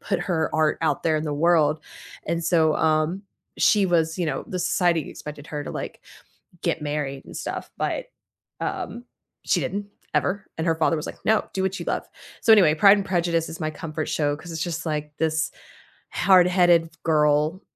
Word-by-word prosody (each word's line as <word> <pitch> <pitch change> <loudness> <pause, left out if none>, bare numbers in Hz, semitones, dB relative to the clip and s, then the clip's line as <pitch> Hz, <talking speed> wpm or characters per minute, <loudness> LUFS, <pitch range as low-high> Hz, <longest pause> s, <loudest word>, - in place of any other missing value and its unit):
put 195 -4 -2
her 170 -3 -1
art 155 -1 +2
out 160 - +1
there 160 -2 +2
in 155 - -2
the 150 - -2
world. 155 -1 +3 0.5
And 170 0 -1
so, 160 -2 +3
um, 160 +4 +1 0.4
she 205 -3 +4
was, 165 -1 +1
you 175 - 0
know 135 -3 -2
the 185 - -3
society 175 -2 +1
expected 150 -1 -9
her 150 -1 -4
to, - - -6
like, - - -6 0.6
get - - -1
married 145 -2 -3
and - - -12
stuff, - - -5
but, - - -2 0.5
um, 240 +1 -4 0.4
she - - +2
didn't, 200 +1 -3 0.3
ever, 195 +2 0
and 160 - -1
her 165 - +3
father 165 +1 +1
was 155 - -4
like, - - -9
"No, 220 0 +2
do 190 - -1
what 190 0 -1
you - - -6
love." - - -2 0.4
So 225 - +6
anyway, 180 -8 +6
Pride 200 +5 +6
and 195 - -3
Prejudice 170 -3 0
is 160 - -8
my 155 - -1
comfort 155 0 -5
show 145 -1 0
'cause 170 +2 -10
it's 160 0 -3
just, 165 -2 -3
like, 150 -1 -3
this 160 -1 0 0.6
hard-headed 180 -2 +4
girl 150 +3 +2
165 Hz, 190 wpm, -24 LUFS, 155-180 Hz, 0.6 s, So